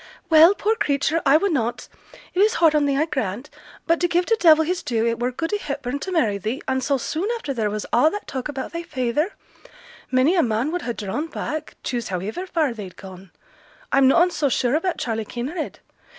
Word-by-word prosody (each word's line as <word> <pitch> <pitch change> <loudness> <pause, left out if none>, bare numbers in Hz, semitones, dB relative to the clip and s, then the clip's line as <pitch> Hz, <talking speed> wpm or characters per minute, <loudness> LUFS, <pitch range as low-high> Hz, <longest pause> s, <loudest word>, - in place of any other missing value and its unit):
'Well, 325 +5 +8
poor 430 +3 +1
creature, 310 -2 0
I 275 +3 +7
wunnot. 285 - -1 0.5
It 365 - -2
is 430 +4 +4
hard 325 -2 +4
on 295 -1 +2
thee, 275 -1 +1
I 305 - +2
grant. 260 - -4 0.3
But 335 0 +2
to 350 - +2
give 350 +1 +1
t' 455 - +3
devil 320 -3 +6
his 360 +2 -1
due, 230 -2 -1
it 230 0 0
were 245 +1 0
good 325 +9 -4
i' - - +2
Hepburn 280 -6 -4
to 380 - -5
marry 225 - +1
thee, 220 +7 -3
and 260 0 0
so 280 0 +1
soon 325 - -3
after 300 -12 -4
there 220 -4 -1
was 210 0 -4
a' 310 - +5
that 415 +5 -6
talk 265 +1 -5
about 275 +1 -5
thy 335 - -3
feyther. 295 - -1 0.8
Many 260 +6 +3
a 360 - +4
man 235 +4 0
would 355 +1 -2
ha' 240 - -4
drawn 215 +11 -3
back, 310 -1 -5
choose 240 -3 -3
howiver 205 - -4
far 315 -8 0
they'd 200 -5 -9
gone. 190 -1 -11 0.6
I'm 270 -1 +5
noane 345 +7 +4
so 300 -4 0
sure 245 0 +1
about 335 +4 0
Charley 225 -2 -2
Kinraid. 270 - -5
285 Hz, 215 wpm, -22 LUFS, 240-335 Hz, 0.8 s, Well